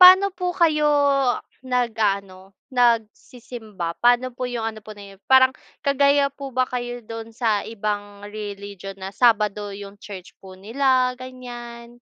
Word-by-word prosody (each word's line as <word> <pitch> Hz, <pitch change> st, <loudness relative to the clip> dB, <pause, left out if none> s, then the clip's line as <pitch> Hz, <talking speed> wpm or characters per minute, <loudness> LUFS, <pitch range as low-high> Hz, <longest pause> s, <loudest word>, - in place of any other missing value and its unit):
paano 370 Hz, +2 st, +10 dB
po 360 Hz, 0 st, -1 dB
kayo 305 Hz, -3 st, +3 dB, 0.7 s
nag-a-ano 200 Hz, -6 st, -1 dB, 0.2 s
nagsisimba, 225 Hz, -5 st, -1 dB
paano 245 Hz, +1 st, +4 dB
po 250 Hz, 0 st, -3 dB
yung 235 Hz, -2 st, -3 dB
ano 215 Hz, -, -10 dB
po 215 Hz, -, -12 dB
na 200 Hz, -1 st, -11 dB
'yon 195 Hz, -, -24 dB
parang 260 Hz, 0 st, +7 dB, 0.3 s
kagaya 280 Hz, 0 st, +4 dB
po 275 Hz, -1 st, -7 dB
ba 255 Hz, -, +3 dB
kayo 245 Hz, -1 st, -4 dB
do'n 225 Hz, +1 st, -8 dB
sa 220 Hz, -4 st, +1 dB
ibang 205 Hz, -2 st, -4 dB
religion 200 Hz, -2 st, -7 dB
na 190 Hz, +1 st, -6 dB
Sabado 210 Hz, -3 st, +2 dB
yung 200 Hz, 0 st, -9 dB
church 190 Hz, -3 st, -9 dB
po 190 Hz, -1 st, -11 dB
nila, 255 Hz, +4 st, +2 dB
ganyan? 240 Hz, -2 st, -9 dB
230 Hz, 140 wpm, -23 LUFS, 205-255 Hz, 0.7 s, paano